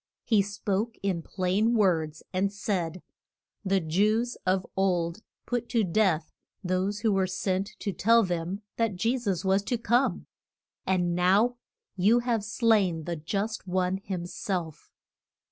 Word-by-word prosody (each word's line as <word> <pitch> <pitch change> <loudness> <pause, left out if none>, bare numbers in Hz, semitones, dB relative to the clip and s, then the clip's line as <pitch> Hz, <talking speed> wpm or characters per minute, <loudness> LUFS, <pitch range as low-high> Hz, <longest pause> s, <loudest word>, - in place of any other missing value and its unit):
He 215 -4 +3
spoke 205 +2 -2
in 185 -4 0
plain 195 +7 0
words, 160 -7 +1
and 195 +2 +1
said, 185 -4 -3 0.6
The 195 -1 +2
Jews 210 +9 +1
of 185 0 +2
old 180 -1 0 0.2
put 240 -1 -2
to 230 -3 +2
death 180 -4 +1 0.3
those 190 +3 -1
who 220 -2 +2
were 190 -1 +2
sent 190 +1 -2
to 200 - -3
tell 230 +5 +4
them 180 +2 -3
that 225 -4 +1
Je 230 +8 0
sus 195 -6 -2
was 190 +1 +3
to 245 - 0
come; 235 -3 +1 0.6
and 180 -2 +1
now 195 +8 +3 0.4
you 205 +6 +4
have 240 -3 0
slain 210 -6 +2
the 170 +2 -3
Just 200 +7 -3
One 185 +1 0
him 190 -3 -5
self. 175 -3 -4
195 Hz, 145 wpm, -28 LUFS, 180-220 Hz, 0.6 s, tell